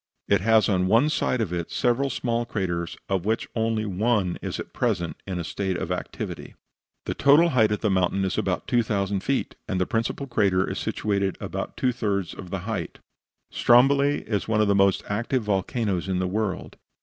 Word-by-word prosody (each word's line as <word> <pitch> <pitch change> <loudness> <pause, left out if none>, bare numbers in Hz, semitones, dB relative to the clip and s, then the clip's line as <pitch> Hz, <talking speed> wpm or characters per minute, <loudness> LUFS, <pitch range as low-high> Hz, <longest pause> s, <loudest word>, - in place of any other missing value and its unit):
It 100 -3 +3
has 110 +1 +4
on 95 -2 +1
one 115 +9 +4
side 125 -5 0
of 95 -6 -2
it 85 -1 -3
several 130 +2 +1
small 120 -2 -1
craters, 85 -7 -3
of 95 -3 0
which 110 +3 -1
only 110 -1 0
one 100 -1 0
is - - -4
at - - -7
present 90 -9 -1
in 95 -2 -3
a 85 - -2
state 95 +3 -2
of - - -4
activity. - - -5 0.5
The - - -2
total 150 +5 +5
height 110 -7 +3
of 105 - -1
the 105 - +1
mountain 95 +1 +1
is 95 - -1
about 90 -2 -1
2000 100 -5 +1
feet, 135 +7 -1
and 95 - -1
the 90 - +2
principal 115 +6 -2
crater 100 -7 +1
is - - -3
situated 100 -2 -1
at - - -5
about - - -5
two 130 - +2
thirds 100 -6 -2
of 95 - -9
the 95 0 -3
height. 110 +2 -4 0.5
Stromboli 140 +4 +4
is 105 -3 -2
one 110 -1 +1
of 105 - +3
the 100 - +4
most 100 -1 +3
active 115 +4 -1
volcanoes 100 -1 -1
in 95 -1 0
the 90 - 0
world. 100 0 -3
105 Hz, 195 wpm, -25 LUFS, 95-115 Hz, 0.5 s, total